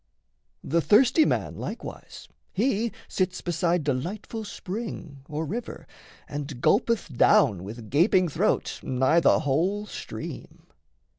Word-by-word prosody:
The 165 +3 +1
thirsty 255 - +5
man, - - 0
Likewise, - - -7 0.2
he 230 +1 0 0.2
sits 185 -1 -1
beside 175 -1 0
delightful 180 - -3
spring 195 -8 -6
Or 155 +1 -3
river 225 +10 -5 0.4
and 145 -3 -5
gulpeth 210 - +1
down 105 -6 +4
with 110 +2 -9
gaping 180 +5 +4
throat 155 - 0
Nigh 130 +6 +2
the - - +4
whole 175 +9 0
stream. - - -8
170 Hz, 115 wpm, -26 LUFS, 145-210 Hz, 0.4 s, thirsty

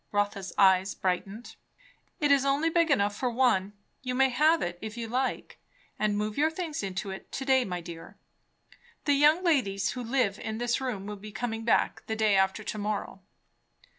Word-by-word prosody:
Rotha's 205 -2 -1
eyes 190 0 +4
brightened. 195 +5 -3 0.6
"It 295 -3 +2
is 280 -1 +5
only 280 +4 +1
big 335 -1 +2
enough 205 -7 +2
for 250 +3 -1
one. 230 -5 +1 0.3
You 250 -1 -3
may 265 +1 +4
have 305 +6 +3
it, 175 0 -4
if 220 +1 -7
you 230 -1 -4
like. 255 +3 -2 0.4
And 210 -1 +1
move 210 +3 -2
your 310 +2 +4
things 320 -2 -4
into 195 0 -4
it 190 - -9
to 270 - -4
day, 260 -2 +3
my 180 -2 -4
dear. 165 -1 -10 0.9
The 290 - +3
young 300 +5 +4
ladies 205 - +1
who 250 - -5
live 230 -4 0
in 220 -1 -4
this 240 +2 -1
room 230 -7 -3
will 210 0 -6
be 210 +2 -10
coming 225 0 -4
back 230 - +2
the 220 - -2
day 215 -2 +2
after 190 +2 +1
to 215 - -5
morrow." 205 -2 -3
220 Hz, 190 wpm, -28 LUFS, 200-265 Hz, 0.9 s, is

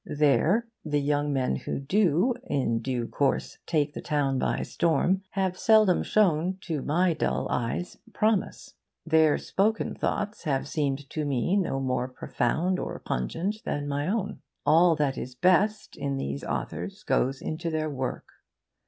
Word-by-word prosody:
There 155 - +3 0.2
the 150 -2 0
young 145 +1 0
men 130 - 0
who - - -4
do 185 - +2
in 115 -5 0
due 120 -1 -2
course 140 -2 -1
take 150 -2 +1
the - - -6
town 140 -3 0
by - - 0
storm 170 +3 +1
have 190 -2 -1
seldom 215 -5 +5
shown 185 -3 +2
(to 160 -7 -3
my 170 +5 +2
dull - - -1
eyes) 125 +9 -2
promise. 215 -3 0 0.3
Their 160 -2 +4
spoken 215 +3 0
thoughts 205 -2 -3
have 135 -2 0
seemed 140 -2 -2
to 155 - -2
me 140 - 0
no 175 -9 0
more 130 -1 -1
profound 155 +8 -1
or - - -4
pungent 180 - -3
than 145 0 -2
my 145 +1 -1
own. 205 0 -2 0.2
All 165 +3 +5
that 145 -3 0
is 125 0 -7
best 190 +8 +2
in 140 -1 -2
these 70 - -4
authors - - -4
goes 135 +1 +1
into 165 +2 -3
their 155 -1 -1
work. 130 -2 -3
150 Hz, 155 wpm, -27 LUFS, 135-185 Hz, 0.3 s, seldom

